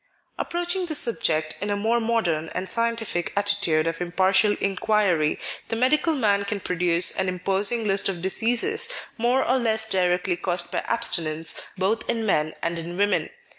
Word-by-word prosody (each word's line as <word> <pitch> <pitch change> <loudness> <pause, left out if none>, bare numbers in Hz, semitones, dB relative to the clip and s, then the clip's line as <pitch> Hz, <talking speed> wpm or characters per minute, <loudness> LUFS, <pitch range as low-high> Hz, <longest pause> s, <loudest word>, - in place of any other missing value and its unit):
Approaching 350 +1 -1
the 310 - -3
subject 160 - -1
in 205 - -2
a 205 - +1
more 225 +4 +1
modern 205 -9 0
and 185 +1 -2
scientific 230 -6 -1
attitude 200 -6 +1
of 165 +1 -2
impartial 190 +4 +3
inquiry, 195 -5 +1 0.3
the - - -2
medical 300 +7 +2
man 205 -6 +2
can 200 0 -3
produce 175 -2 +1
an 190 -1 0
imposing 195 +5 +1
list 195 -1 +1
of 185 -3 -3
diseases 245 - +1 0.3
more 245 +3 +2
or 260 +2 +3
less 220 -2 0
directly 180 -2 +1
caused 175 -1 -2
by - - 0
abstinence 165 -8 0 0.2
both 205 +5 0
in 230 -2 0
men 155 -6 +1
and 170 0 -1
in 170 +2 -6
women. 205 +1 +1
200 Hz, 160 wpm, -24 LUFS, 175-230 Hz, 0.3 s, impartial